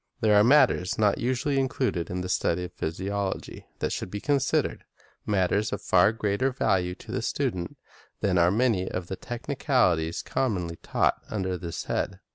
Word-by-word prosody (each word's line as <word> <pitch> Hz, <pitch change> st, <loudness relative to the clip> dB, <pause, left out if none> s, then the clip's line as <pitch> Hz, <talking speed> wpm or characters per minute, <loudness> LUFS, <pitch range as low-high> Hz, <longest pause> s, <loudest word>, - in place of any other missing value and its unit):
There 110 Hz, -1 st, +4 dB
are 105 Hz, 0 st, +6 dB
matters 120 Hz, -7 st, +4 dB
not 105 Hz, -2 st, +2 dB
usually 130 Hz, +3 st, 0 dB
included 130 Hz, -9 st, -1 dB
in 90 Hz, 0 st, -3 dB
the 90 Hz, -, -4 dB
study 90 Hz, -1 st, 0 dB
of 90 Hz, -, -7 dB
physiology 95 Hz, +4 st, -4 dB
that -, -, -2 dB
should -, -, -3 dB
be 105 Hz, -, -4 dB
considered, 140 Hz, +1 st, 0 dB, 0.2 s
— -, -, -34 dB
matters 100 Hz, +1 st, +1 dB
of 100 Hz, -, -2 dB
far 90 Hz, +3 st, +4 dB
greater 110 Hz, +3 st, 0 dB
value 90 Hz, -8 st, 0 dB
to -, -, -11 dB
the -, -, -1 dB
student 85 Hz, -2 st, -2 dB, 0.4 s
than 95 Hz, -3 st, +2 dB
are 85 Hz, 0 st, +5 dB
many 105 Hz, -3 st, +1 dB
of 90 Hz, -1 st, -5 dB
the 95 Hz, -, -3 dB
technicalities 120 Hz, -, 0 dB
commonly 90 Hz, -10 st, -1 dB
taught -, -, 0 dB
under 95 Hz, -3 st, -2 dB
this 85 Hz, -2 st, -5 dB
head. 95 Hz, 0 st, -2 dB
100 Hz, 170 wpm, -27 LUFS, 90-120 Hz, 0.4 s, are